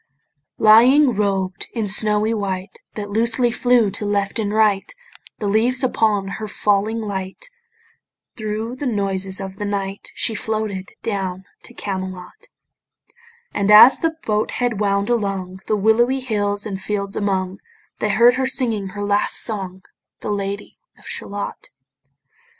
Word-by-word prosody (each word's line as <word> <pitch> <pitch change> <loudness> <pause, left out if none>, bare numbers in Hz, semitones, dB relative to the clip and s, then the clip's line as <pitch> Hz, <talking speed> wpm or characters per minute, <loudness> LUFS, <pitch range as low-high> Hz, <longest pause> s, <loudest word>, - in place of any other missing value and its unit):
Lying, 250 +6 +6
robed 195 -3 -2
in 225 -3 -2
snowy 210 +2 +5
white 190 -2 -4 0.2
That 205 -1 -6
loosely 235 +3 +2
flew 245 -3 +2
to 210 - -5
left 205 +1 -1
and 205 -2 -1
right 210 -2 +2 0.5
The 215 - -5
leaves 235 +6 +1
upon 215 -5 +1
her 215 +2 -5
falling 210 +2 0
light 200 - -6 0.8
Thro' 220 +1 -4
the 260 +2 -4
noises 195 -3 -2
of 190 0 -7
the 205 - -4
night 200 -1 -4
She 225 - -1
floated 215 -3 -3
down 190 -3 -3 0.2
to - - -13
Camelot: 185 -2 -6 1.1
And 200 0 -1
as 215 +5 +9
the 325 -1 -1
boat 210 0 0
head 240 -4 -1
wound 200 -1 0
along 195 -5 -2
The 215 - +1
willowy 235 +6 +2
hills 205 -5 -2
and 195 -3 -5
fields 200 -1 -3
among, 190 -2 -2 0.4
They 210 - -1
heard 240 +4 +4
her 260 0 0
singing 230 -7 0
her 205 +2 -6
last 205 0 +2
song, 190 -4 -4 0.4
The - - -3
Lady 200 0 -5 0.2
of - - -20
Shalott. 200 0 -6
205 Hz, 140 wpm, -20 LUFS, 195-225 Hz, 1.1 s, as